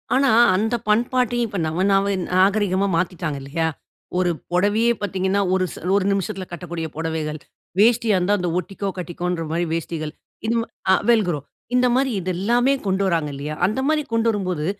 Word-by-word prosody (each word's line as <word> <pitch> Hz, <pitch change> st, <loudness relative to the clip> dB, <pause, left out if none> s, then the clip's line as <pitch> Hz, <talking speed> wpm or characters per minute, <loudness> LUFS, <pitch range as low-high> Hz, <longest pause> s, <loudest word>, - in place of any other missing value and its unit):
ஆனா, 275 Hz, +1 st, +4 dB, 0.3 s
அந்த 220 Hz, +5 st, +1 dB
பண்பாட்டயும், 240 Hz, +2 st, +2 dB
இப்ப 205 Hz, -, -5 dB
நவ 160 Hz, +3 st, -2 dB
நாவ 195 Hz, +1 st, +3 dB, 0.2 s
நாகரீகமா 195 Hz, 0 st, +3 dB
மாத்தீட்டாங்க 170 Hz, -4 st, -2 dB
இல்லயா? 160 Hz, +4 st, -1 dB, 0.5 s
ஒரு 180 Hz, -1 st, +2 dB, 0.2 s
பொடவையே 205 Hz, +6 st, +3 dB
பாத்தீங்கன்னா, 195 Hz, 0 st, 0 dB
ஒரு 185 Hz, 0 st, +2 dB
ச -, -, -11 dB, 0.2 s
ஒரு 200 Hz, -, +2 dB
நிமிஷத்துல 190 Hz, -1 st, -2 dB
கட்டக்கூடிய 175 Hz, -2 st, -5 dB
பொடவைகள். 160 Hz, -2 st, -3 dB, 0.4 s
வேஷ்டியா 225 Hz, 0 st, +4 dB
இருந்தா 195 Hz, +3 st, +2 dB
அந்த 180 Hz, -1 st, -1 dB
ஒட்டிக்கோ, 195 Hz, +2 st, -4 dB
கட்டிக்கோன்ற 175 Hz, 0 st, -3 dB
மாதிரி 170 Hz, +2 st, 0 dB
வேஷ்டிகள். 160 Hz, -2 st, -3 dB, 0.3 s
இந்த 230 Hz, -, +1 dB
ம -, -, -4 dB, 0.3 s
அ -, -, +7 dB
வெல் 225 Hz, -3 st, +5 dB
க்ரோ, 155 Hz, -4 st, -1 dB, 0.4 s
இந்த 250 Hz, 0 st, +4 dB
மாதிரி 265 Hz, -1 st, +2 dB
இது 185 Hz, -, -2 dB
எல்லாமே 240 Hz, +7 st, +2 dB
கொண்டு 190 Hz, +1 st, +1 dB
வராங்க 165 Hz, -5 st, 0 dB
இல்லையா? 150 Hz, +2 st, -5 dB
அந்த 215 Hz, +6 st, -2 dB
மாதிரி 310 Hz, -1 st, +2 dB
கொண்டு 230 Hz, 0 st, +2 dB
வரும்போது, 185 Hz, -7 st, -2 dB
190 Hz, 165 wpm, -22 LUFS, 170-220 Hz, 0.5 s, அ